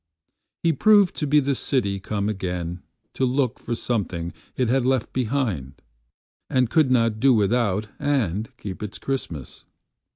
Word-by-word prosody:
He 165 Hz, -1 st, +3 dB
proved 205 Hz, +4 st, +5 dB
to 150 Hz, -, -1 dB
be 150 Hz, +2 st, +5 dB
the 140 Hz, 0 st, +1 dB
city 105 Hz, -7 st, 0 dB
come 100 Hz, +1 st, -2 dB
againTo 90 Hz, -4 st, -3 dB, 0.4 s
look 130 Hz, -1 st, +1 dB
for 120 Hz, -, -3 dB
something 90 Hz, -8 st, -2 dB, 0.2 s
it 125 Hz, -, +1 dB
had 130 Hz, +2 st, +2 dB
left 130 Hz, -2 st, 0 dB
behindAnd 95 Hz, -, -3 dB
could 155 Hz, -5 st, +4 dB
not 115 Hz, -4 st, +2 dB
do 130 Hz, 0 st, +5 dB
without 105 Hz, -1 st, +1 dB
and 115 Hz, -, 0 dB
keep 95 Hz, -3 st, -7 dB
its 105 Hz, -2 st, -5 dB
Christmas. 85 Hz, -, -5 dB
115 Hz, 135 wpm, -24 LUFS, 95-130 Hz, 0.4 s, proved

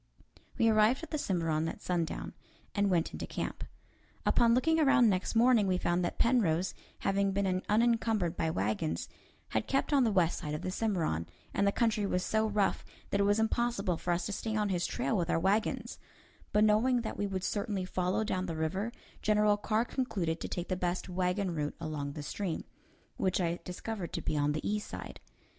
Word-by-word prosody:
We 230 Hz, -, +4 dB
arrived 220 Hz, +6 st, +4 dB
at -, -, -8 dB
the 305 Hz, -, -1 dB
Cimarron 165 Hz, -, 0 dB
at -, -, -5 dB
sundown, 170 Hz, -3 st, -2 dB, 0.4 s
and 200 Hz, -1 st, +2 dB
went 170 Hz, -3 st, +1 dB
into -, -, -5 dB
camp. -, -, -4 dB, 0.6 s
Upon 235 Hz, -1 st, +4 dB
looking 320 Hz, +6 st, +3 dB
around 275 Hz, -5 st, +5 dB
next 185 Hz, +4 st, -1 dB
morning, 230 Hz, -3 st, +5 dB
we 185 Hz, -1 st, +2 dB
found 175 Hz, 0 st, 0 dB
that 175 Hz, -, -2 dB
Penrose, 190 Hz, -8 st, +2 dB, 0.3 s
having 195 Hz, 0 st, +1 dB
been 190 Hz, -2 st, +1 dB
unencumbered 225 Hz, -4 st, +2 dB
by 160 Hz, -, 0 dB
wagons, 95 Hz, -, -1 dB, 0.4 s
had 110 Hz, -, -1 dB
kept 275 Hz, +2 st, 0 dB
on 275 Hz, -2 st, +5 dB
the 225 Hz, -, +2 dB
west 180 Hz, -4 st, +2 dB
side 150 Hz, 0 st, -4 dB
of 150 Hz, -, -6 dB
the 185 Hz, -, -2 dB
Cimarron, 175 Hz, -, -1 dB, 0.3 s
and 200 Hz, -, +2 dB
the -, -, +4 dB
country 215 Hz, -2 st, +1 dB
was 180 Hz, -1 st, 0 dB
so 220 Hz, 0 st, +1 dB
rough 205 Hz, -2 st, +1 dB, 0.3 s
that 200 Hz, -, +1 dB
it 200 Hz, -, +3 dB
was 205 Hz, +1 st, +3 dB
impossible 220 Hz, -4 st, +1 dB
for 175 Hz, -, -2 dB
us 175 Hz, 0 st, 0 dB
to 210 Hz, -, -3 dB
stay 220 Hz, +2 st, -3 dB
on 210 Hz, -1 st, +1 dB
his 175 Hz, -2 st, 0 dB
trail 245 Hz, -2 st, -1 dB
with 175 Hz, -4 st, 0 dB
our -, -, +2 dB
wagons; 200 Hz, +5 st, 0 dB, 0.5 s
but 210 Hz, -, +4 dB
knowing 230 Hz, +4 st, +4 dB
that 225 Hz, -, -4 dB
we 205 Hz, -, -1 dB
would 190 Hz, -2 st, -3 dB
certainly 200 Hz, -2 st, -1 dB
follow 185 Hz, +3 st, 0 dB
down 185 Hz, -3 st, -2 dB
the 165 Hz, -2 st, -4 dB
river, 190 Hz, +8 st, -1 dB, 0.3 s
General 210 Hz, 0 st, +4 dB
Carr 215 Hz, +2 st, 0 dB
concluded 190 Hz, -12 st, -2 dB
to -, -, -3 dB
take 175 Hz, 0 st, -4 dB
the 185 Hz, -, +1 dB
best 180 Hz, +1 st, -2 dB
wagon 180 Hz, +1 st, 0 dB
route 150 Hz, -2 st, -2 dB
along 145 Hz, -2 st, -4 dB
the 150 Hz, -1 st, -6 dB
stream, 185 Hz, +2 st, -3 dB, 0.5 s
which 185 Hz, 0 st, +1 dB
I 170 Hz, -1 st, 0 dB
discovered 180 Hz, 0 st, -5 dB
to -, -, -2 dB
be -, -, -1 dB
on 145 Hz, 0 st, +2 dB
the 155 Hz, -, -3 dB
east 210 Hz, 0 st, -1 dB
side. -, -, -8 dB
195 Hz, 200 wpm, -31 LUFS, 175-220 Hz, 0.6 s, around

